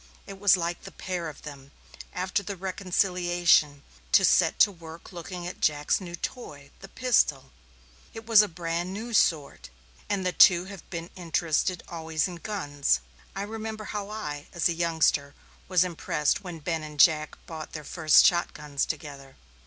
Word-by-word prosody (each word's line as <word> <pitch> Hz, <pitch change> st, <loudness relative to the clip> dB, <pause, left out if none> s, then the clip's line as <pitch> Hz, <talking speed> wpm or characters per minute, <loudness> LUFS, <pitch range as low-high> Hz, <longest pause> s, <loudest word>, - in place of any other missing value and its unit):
It 195 Hz, -1 st, -10 dB
was 200 Hz, -2 st, +5 dB
like 170 Hz, 0 st, -3 dB
the -, -, -10 dB
pair 180 Hz, -3 st, -4 dB
of 155 Hz, -, -13 dB
them, 140 Hz, -2 st, -10 dB, 0.4 s
after 185 Hz, +2 st, -1 dB
the 200 Hz, 0 st, -6 dB
reconciliation, 175 Hz, -5 st, +1 dB, 0.3 s
to 195 Hz, -, +6 dB
set 165 Hz, -3 st, +3 dB
to 205 Hz, -, +6 dB
work 165 Hz, -1 st, -12 dB
looking 175 Hz, 0 st, -7 dB
at 180 Hz, -, -7 dB
Jack's 150 Hz, +4 st, +1 dB
new 175 Hz, -2 st, -6 dB
toy, 145 Hz, -, -7 dB
the -, -, -11 dB
pistol. 150 Hz, -, +1 dB, 0.6 s
It 225 Hz, 0 st, -10 dB
was 225 Hz, -2 st, +7 dB
a 210 Hz, -, 0 dB
brand 170 Hz, +1 st, -3 dB
new 230 Hz, +4 st, -6 dB
sort, 145 Hz, -, +1 dB, 0.4 s
and 200 Hz, -2 st, -1 dB
the 180 Hz, -, +1 dB
two 180 Hz, 0 st, +6 dB
have 190 Hz, -2 st, -11 dB
been 170 Hz, -1 st, -6 dB
interested 170 Hz, 0 st, -1 dB
always 160 Hz, 0 st, -2 dB
in 180 Hz, -2 st, -8 dB
guns 145 Hz, -, -1 dB, 0.4 s
I 195 Hz, -, -3 dB
remember 220 Hz, +1 st, -6 dB
how 205 Hz, -1 st, -5 dB
I, 150 Hz, -9 st, -6 dB
as 175 Hz, -, +2 dB
a 170 Hz, -, 0 dB
youngster, 160 Hz, -4 st, +1 dB, 0.3 s
was 185 Hz, -1 st, +4 dB
impressed 165 Hz, -1 st, -1 dB
when 175 Hz, -3 st, -7 dB
Ben 160 Hz, +1 st, -3 dB
and 150 Hz, -1 st, -9 dB
Jack 155 Hz, 0 st, +4 dB
bought 160 Hz, -2 st, -8 dB
their 155 Hz, -, -6 dB
first 155 Hz, 0 st, +4 dB
shot 175 Hz, -1 st, +2 dB
guns 145 Hz, -2 st, -3 dB
together. 140 Hz, -3 st, -7 dB
175 Hz, 170 wpm, -27 LUFS, 155-190 Hz, 0.6 s, was